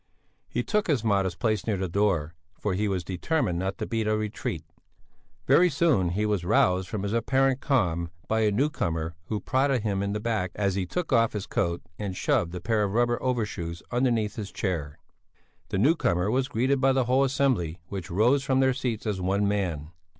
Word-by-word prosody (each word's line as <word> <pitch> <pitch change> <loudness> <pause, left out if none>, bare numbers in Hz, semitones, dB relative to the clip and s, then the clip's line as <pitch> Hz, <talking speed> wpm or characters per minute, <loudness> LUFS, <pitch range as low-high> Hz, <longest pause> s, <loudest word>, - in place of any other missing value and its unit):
He - - -1
took 210 -1 0
his 145 -9 +1
modest 100 -5 +1
place 110 -3 0
near 105 -3 +1
the 95 0 -2
door, 85 -4 0 0.3
for 105 - -1
he 105 +3 0
was 95 -3 -1
determined 90 - -1
not 95 +1 -2
to - - -3
beat 115 -2 -1
a 110 0 +2
retreat. 105 -6 -3 0.8
Very 180 +1 +5
soon 140 - +2
he 105 +5 0
was 105 -4 0
roused 90 -1 +2
from 105 -3 -3
his 100 +1 -2
apparent 130 +3 +2
calm 85 - +1 0.2
by 110 - +1
a 110 -1 +3
newcomer 85 - -1
who 105 +3 -2
prodded 130 -1 +1
him 100 -3 0
in 100 0 -1
the 105 - -2
back 105 -5 -1
as 100 -2 0
he 95 -1 -2
took 165 - -2
off 115 -2 +3
his 105 -2 -3
coat 85 0 -1 0.2
and 100 -3 -4
shoved 85 +1 0
a - - -4
pair 110 +4 0
of 100 -1 0
rubber 120 +1 +1
overshoes 105 -9 -2
underneath 120 -3 +1
his 105 -3 -5
chair. 80 -7 -3 0.7
The - - -1
newcomer 100 - +2
was 130 +2 +1
greeted 130 +4 +1
by 135 0 +4
the 130 -1 +2
whole 130 +3 +3
assembly 130 - +1
which 95 -4 -5
rose 120 +10 +3
from 130 0 +1
their 130 -1 +4
seats 125 -4 -3
as 100 -4 -2
one 100 +2 +1
man. 85 -7 -2
105 Hz, 200 wpm, -27 LUFS, 95-125 Hz, 0.8 s, Very